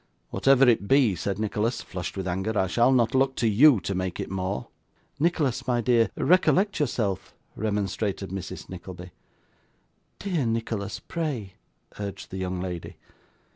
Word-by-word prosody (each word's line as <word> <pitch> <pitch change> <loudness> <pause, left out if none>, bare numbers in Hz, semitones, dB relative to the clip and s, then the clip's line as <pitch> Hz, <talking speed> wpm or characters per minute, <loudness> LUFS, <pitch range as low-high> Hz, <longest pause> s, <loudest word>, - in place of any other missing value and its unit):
'Whatever 135 -1 +4
it 115 -4 +3
be,' 135 -5 +4
said 95 +1 -2
Nicholas, 110 +2 -1
flushed 90 +1 -6
with 95 -1 -3
anger, 95 +4 -1
'I 95 - +3
shall 120 +7 +3
not 120 -3 +3
look 135 0 +2
to 115 - +1
you 120 +3 +6
to 100 - -2
make 95 -1 -3
it - - -4
more.' 95 +1 -3 0.5
'Nicholas, 150 -6 0
my 120 -1 +2
dear, 120 -1 +3
recollect 185 +2 +3
yourself,' 110 -9 -1 0.2
remonstrated 100 -2 -2
Mrs. 95 -2 -6
Nickleby. 90 -1 -9 1.1
'Dear 175 -10 -1
Nicholas, 115 -3 -2
pray,' 135 - -4 0.5
urged 100 -2 -6
the 95 - -5
young 90 -1 -2
lady. 90 -2 -5
110 Hz, 145 wpm, -26 LUFS, 95-130 Hz, 1.1 s, you